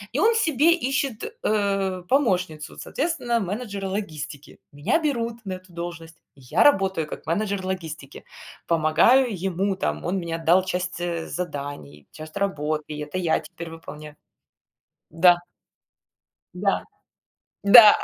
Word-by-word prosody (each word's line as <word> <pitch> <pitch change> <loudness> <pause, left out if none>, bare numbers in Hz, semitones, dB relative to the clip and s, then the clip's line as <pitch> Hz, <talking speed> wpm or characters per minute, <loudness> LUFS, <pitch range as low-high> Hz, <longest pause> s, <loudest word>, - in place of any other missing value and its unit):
И - - +2
он 450 +5 +4
себе 315 - +2
ищет, 270 -6 -2
э, 195 -3 0
помощницу. 185 - 0
Соответственно, 275 -7 -1
менеджера 200 0 -4
логистики. 155 -7 -6
Меня 145 - +1
берут 235 -6 -2
на 190 -1 -3
эту 185 0 -14
должность. 170 -1 -7 0.2
Я 135 +5 +1
работаю 190 - +3
как - - -9
менеджер 195 +2 -1
логистики. 160 -7 -6 0.4
Помогаю 170 +11 +4 0.2
ему, 195 +3 0
там, 190 - -2
он 180 +3 0
мне 170 -3 -3
отдал 170 +3 +3
часть, 180 -1 -3
э, 170 -2 -3
заданий, 145 - -6
часть 155 +4 -9
работы, 155 -6 -2
это 150 +5 -5
я 175 -3 +1
теперь 170 -1 -9
выполняю 150 -2 -10 1.0
Да. 175 +2 +6 1.2
Да, - - 0 0.8
да. 210 +1 +10
185 Hz, 125 wpm, -24 LUFS, 160-210 Hz, 1.2 s, да